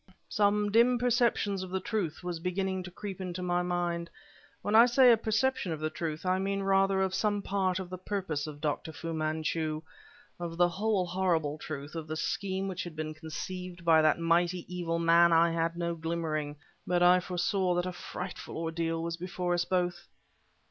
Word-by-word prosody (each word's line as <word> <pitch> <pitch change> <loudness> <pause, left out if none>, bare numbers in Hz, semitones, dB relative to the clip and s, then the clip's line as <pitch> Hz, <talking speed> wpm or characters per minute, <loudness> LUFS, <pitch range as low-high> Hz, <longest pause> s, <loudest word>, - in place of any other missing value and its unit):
Some 205 0 +2
dim 235 +3 +5
perceptions 235 -5 +1
of 185 - -6
the 190 +1 -1
truth 185 -6 -3
was 175 -2 -3
beginning 190 +2 -1
to 180 - -8
creep 195 +1 -7
into 180 -1 -4
my 175 0 +1
mind. 175 -1 -2 0.5
When 205 - -1
I 230 +2 +8
say 250 0 +6
a - - +7
perception 225 -1 0
of 160 - -3
the 155 0 -2
truth, 155 +1 -4
I 185 +1 +2
mean 195 0 -1
rather 195 0 +3
of 190 -1 -1
some 205 +1 0
part 190 -2 0
of 190 -1 -4
the 185 - -5
purpose 185 -7 -3
of 145 -1 -9
Dr. 155 +1 -2
Fu 165 +2 -5
Manchu; 155 0 -1 0.6
of 170 -1 -5
the 175 0 +4
whole 195 +1 0
horrible 170 -5 0
truth, 145 -1 -6
of 165 -2 -5
the 155 - -3
scheme 190 +3 -2
which 185 -2 -3
had 175 -3 -8
been 155 0 -4
conceived 175 +3 -7
by 160 -1 +6
that 155 -1 +4
mighty, 170 +1 +1
evil 175 -2 -2
man, 170 +1 +5
I 165 +1 +5
had 165 0 -1
no 170 0 -1
glimmering, 160 -3 -3 0.3
but 175 0 +2
I 180 +1 +7
foresaw 180 +1 0
that 175 0 0
a 185 - -3
frightful 180 +1 -7
ordeal 165 0 -2
was 170 0 -3
before 180 0 -2
us 175 0 +1
both. 175 -1 -1
175 Hz, 190 wpm, -30 LUFS, 165-190 Hz, 0.6 s, I